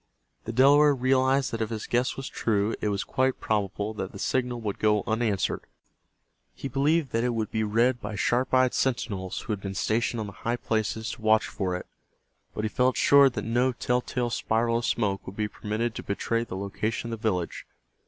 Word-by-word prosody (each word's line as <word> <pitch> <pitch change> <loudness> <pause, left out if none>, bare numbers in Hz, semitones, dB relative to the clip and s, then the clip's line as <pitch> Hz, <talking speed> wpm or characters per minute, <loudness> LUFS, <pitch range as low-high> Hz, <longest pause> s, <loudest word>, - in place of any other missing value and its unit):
The 115 - -3
Delaware 140 +4 +6
realized 130 +1 +2
that 115 - -3
if 110 - -1
his 110 -2 -4
guess 125 +2 0
was 135 - -5
true 105 -1 0
it 105 - 0
was 100 0 -1
quite 130 +3 0
probable 105 0 -1
that 95 -3 -5
the - - -9
signal 125 +3 -1
would 105 -3 -3
go 105 -1 +2
unanswered. 110 -3 0 0.9
He - - -5
believed 140 +2 +1
that 115 +1 0
it 125 -1 0
would 110 -2 -2
be 110 -1 0
read 120 +4 +2
by 105 +1 -5
sharp 120 +5 +1
eyed 130 -1 +4
sentinels 105 -8 -1
who 110 - -3
had 100 - -5
been 95 0 -5
stationed 115 +3 0
on 110 - -2
the 100 - -7
high 120 +1 -1
places 110 -1 -2
to 120 - -9
watch 110 0 +4
for 90 -2 -2
it, 90 - -5 0.7
but 105 - -3
he - - +2
felt 125 +4 +1
sure 140 -1 +6
that 125 - -5
no 120 +3 +2
tell 125 0 0
tale 120 -1 -2
spiral 115 +1 +1
of 120 - -4
smoke 100 -4 -1
would 95 - -7
be 105 0 -1
permitted 110 +3 -3
to - - -6
betray 115 +3 -1
the 95 -5 -6
location 110 +4 -3
of 115 - -5
the 110 - +2
village. 90 -4 -3
115 Hz, 210 wpm, -27 LUFS, 105-125 Hz, 0.9 s, Delaware